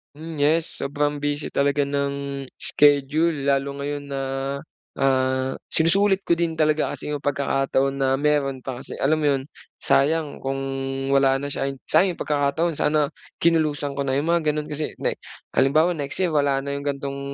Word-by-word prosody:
Mm, 160 +1 -8
yes 155 +3 +2
sobrang 145 +1 -1
busy 145 0 -2
talaga 140 +1 +1
ng 140 -1 -2
iskediul, 145 +1 +2
lalo 140 0 0
ngayon 145 0 -4
na, 135 - -2 0.7
ah, 130 0 +1
sinusulit 195 +4 +4
ko 170 - +1
din 170 -1 0
talaga 155 -1 +1
kasi - - -7
'yong 150 - -1
pagkakataon 135 -1 0
na 135 -1 +2
meron 140 -1 +1
pa 130 -1 -5
kasi 130 - -8
alam 155 +3 +3
mo 155 - -1
'yon. 135 - -1 0.4
Sayang 150 +1 +2
kung 135 0 -3 0.5
wala 135 -1 +3
na 140 - -3
siya. 140 - -2 0.2
Sayang 185 -1 +4
'yong - - -11
pagkakataon. 150 +2 0
Sana 150 -1 +2 0.3
kinulusang 150 -4 +1
ko 140 - -1
na 135 - 0
'yong 145 +4 0
mga 165 -3 +2
gano'n 150 0 -4
kasi 150 0 -4
na - - -1 0.3
halimbawa 155 +5 +3
next 145 +5 -3
year 180 - +2
wala 140 -3 +1
na 140 +1 -3
'yong 140 - -7
gantong 140 -1 -3
145 Hz, 170 wpm, -23 LUFS, 140-155 Hz, 0.7 s, sinusulit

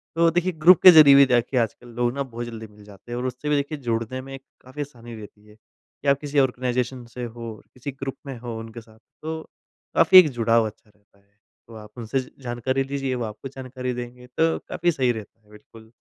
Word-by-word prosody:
तो 165 0 +4
देखिए, 175 +2 0
ग्रुप 170 +2 +5
के 185 - +12
ज़रिए 150 -4 +8
भी 140 0 +8
जाके 125 +1 +1
आजकल 120 +1 -1
लोग 120 0 +2
ना 140 0 -2
बहुत 120 -2 -7
जल्दी 110 -2 -8
मिल 105 0 -18
जाते 105 +3 -15
हैं 120 - -3
और 125 - -4
उससे 130 +4 -4
भी 150 - +3
देखिए 145 +2 -2
जुड़ने 120 0 -3
में 135 +1 -9 0.2
काफ़ी 130 +4 -8
आसानी 120 -5 -9
रहती 105 -1 -13
है 105 - -18
कि 135 +5 -15
आप 140 0 +4
किसी 145 -1 -1
ऑर्गेनाइज़ेशन 125 -1 -1
से 125 - -5
हो 115 -1 -7
और - - -18
किसी 130 +3 -7
ग्रुप 135 0 -6
में 135 -3 -7
हो 120 -2 -6
उनके 115 +1 -9
साथ, 110 0 -21 0.2
तो 160 +1 -4 0.5
काफ़ी 175 +3 +7
एक 160 -5 +5
जुड़ाव 115 0 +3
अच्छा 105 0 -13
रहता 105 -1 -32
है। 100 - -34 0.4
तो 115 - -13
आप 105 -1 -11
उनसे 120 +3 -2
ज 130 - -7
जानकारी 130 +3 -1
लीजिए, 135 -1 -3
वो 120 - -3
आपको 110 +5 -8
जानकारी 130 -1 -6
देंगे। 125 +1 -8
तो 160 +6 +1
काफ़ी 175 0 +1
सही 130 -5 +1
रहता 110 0 -9
है, 105 - -29
बिल्कुल। 110 +1 -16
125 Hz, 230 wpm, -23 LUFS, 115-140 Hz, 0.5 s, के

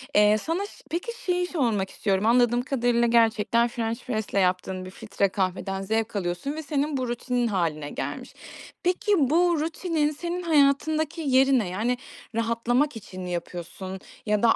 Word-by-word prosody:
Eee, 210 +1 +6
sana 335 - -2
ş - - -11 0.2
peki, 350 +9 -3
şeyi 360 -1 +1
sormak 230 - 0
istiyorum. 195 0 0
Anladığım 240 +1 +4
kadarıyla, 240 -2 +1
gerçekten 230 0 +3
french 230 0 -3
press'le 220 -4 -3
yaptığın 185 -1 0
bir 185 - -8
filtre 200 -1 -1
kahveden 190 0 -2
zevk 220 +2 -1
alıyorsun 180 +7 -2
ve 315 - -5
senin 290 0 -1
bu 255 - -2
rutinin 240 0 -1
hâline 160 -7 -1
gelmiş. - - -5 0.5
Peki, 365 +4 +1
bu 330 +4 +3
rutinin 320 -1 0
senin 345 +4 -4
hayatındaki 310 +1 +2
yeri 270 -2 +4
ne? 205 - -2
Yani, 230 +7 0 0.4
rahatlamak 235 +5 +1
için 195 -4 -8
mi 180 - -5
yapıyorsun 175 +2 -5 0.3
ya 210 0 +1
da 225 - +6
235 Hz, 155 wpm, -26 LUFS, 200-295 Hz, 0.5 s, Eee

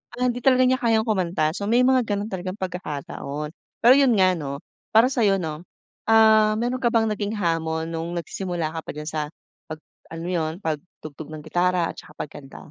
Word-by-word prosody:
ah, 250 - -2
hindi 245 -1 +1
talaga 255 0 +4
niya 255 +1 +3
kayang 225 -3 +2
kumanta 175 -7 +1
so 200 +4 -4
may 240 +3 +4
mga 255 -1 +4
ganun 205 +1 -2
talagang 185 0 -4
pagkakataon. 150 -5 -5 0.3
Pero 240 +2 +9
yun 275 -3 +5
nga 185 -1 +4
no, 140 -4 -5 0.4
para 230 +3 +7
sayo 215 -7 +3
no, 160 -2 -5 0.4
ah, 220 -1 +6
meron 245 +3 -1
ka 240 - +1
bang 225 -2 +2
naging 210 +1 -2
hamon 165 -3 -1
nung 165 +1 -4
nagsisimula 170 -2 -3
ka 165 - -3
pa - - -5
diyan 150 +1 -6
sa 155 0 -2 0.5
pag 155 0 -6 0.3
alam 165 0 -7
mo 180 - -3
yun 160 -2 -1
pag-tugtog 155 -2 -6
ng 155 -1 -8
gitara 175 +1 +1
at - - -30
saka - - -12
pagkanta? 140 -2 -12
180 Hz, 195 wpm, -24 LUFS, 160-225 Hz, 0.5 s, Pero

